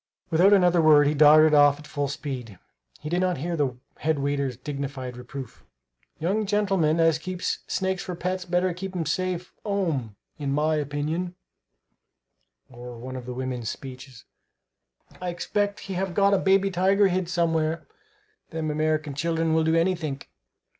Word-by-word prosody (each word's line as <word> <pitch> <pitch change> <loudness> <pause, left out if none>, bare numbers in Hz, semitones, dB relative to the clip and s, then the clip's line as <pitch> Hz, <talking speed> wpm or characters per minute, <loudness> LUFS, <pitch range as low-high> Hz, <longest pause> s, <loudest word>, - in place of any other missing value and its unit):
Without 175 +5 +5
another 180 -4 +5
word 150 -2 +6
he 145 - +2
darted 155 +1 +7
off 145 -1 +6
at 150 - -13
full 145 -1 -2
speed. 130 -7 -6 0.4
He 150 - -6
did 175 +3 0
not 185 -1 +1
hear 170 +5 -3
the 135 -6 -1 0.2
head 160 0 0
waiter's 140 -3 -1
dignified 135 -2 -5
reproof: 125 +1 -9 0.5
"Young 195 +7 -1
gentlemen 195 -6 +2
as 165 -1 +3
keeps 185 +1 -3
snakes 190 -1 -1
for 180 - -5
pets 185 +2 -2
better 180 +1 0
keep 190 +2 -7
'em 170 -2 -1
safe 180 +2 -2
'ome, 165 - -1 0.2
in 140 -2 -2
my 155 +2 +1
opinion;" 155 +4 -2 1.3
or 120 -1 -10
one 130 +2 -7
of 125 -1 -7
the 125 - -4
women's 125 -3 -3
speeches: 130 -2 -9 1.0
"I 180 - -2
expect 205 +3 -2
he 195 - -6
have 185 -1 -2
got 200 0 +4
a 195 - +4
baby 195 0 +3
tiger 195 +3 +3
hid 180 -1 -1
somewhere; 165 -2 0 0.6
them 160 -2 -3
American 155 -1 0
children 165 +2 0
will 160 0 +3
do 160 +1 +2
anythink!" 165 -5 -1
160 Hz, 160 wpm, -25 LUFS, 140-180 Hz, 1.3 s, darted